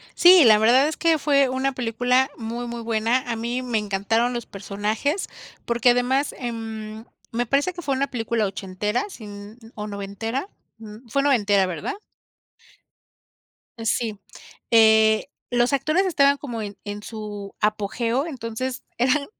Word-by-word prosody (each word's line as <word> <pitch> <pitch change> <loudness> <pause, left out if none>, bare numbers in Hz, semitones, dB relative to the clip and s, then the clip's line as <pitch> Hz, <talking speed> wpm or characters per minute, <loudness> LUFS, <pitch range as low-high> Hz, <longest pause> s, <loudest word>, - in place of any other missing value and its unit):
Sí, 355 -2 +8
la 215 -3 +7
verdad 245 +6 +5
es 315 - -4
que 330 -2 +2
fue 280 -2 +3
una 260 +1 -1
película 250 +2 +1
muy, 235 +1 -5
muy 235 -1 -6
buena. 230 +3 0
A 230 - -1
mí 240 +3 -3
me 240 -3 -1
encantaron 210 +4 0
los 240 -2 -4
personajes, 210 - -2 0.4
porque 235 +1 +3
además, 255 +3 +1
em, 225 -2 -6 0.3
me 240 +1 -1
parece 280 +9 +1
que 350 0 -8
fue 280 -4 0
una 275 +1 0
película 225 -2 -1
ochentera, 195 +4 -2
sin 210 - -10 0.2
o 210 -1 -5
noventera. 210 - -4 0.3
Mm, 220 +2 -12
fue 275 +5 +1
noventera, 205 -8 +3
¿verdad? 185 - -4 1.8
Eh, 225 -1 -7
sí. 220 -2 -1 0.5
Eh, 220 -1 +5 0.2
los 245 +2 +2
actores 310 +8 +2
estaban 280 -5 +4
como 245 -6 -6
en 205 -1 -7
en 205 0 -6
su 210 -2 -7
apogeo, 230 +5 0
entonces 255 -2 -5 0.2
eran 265 +4 +2
235 Hz, 145 wpm, -23 LUFS, 215-265 Hz, 1.8 s, Sí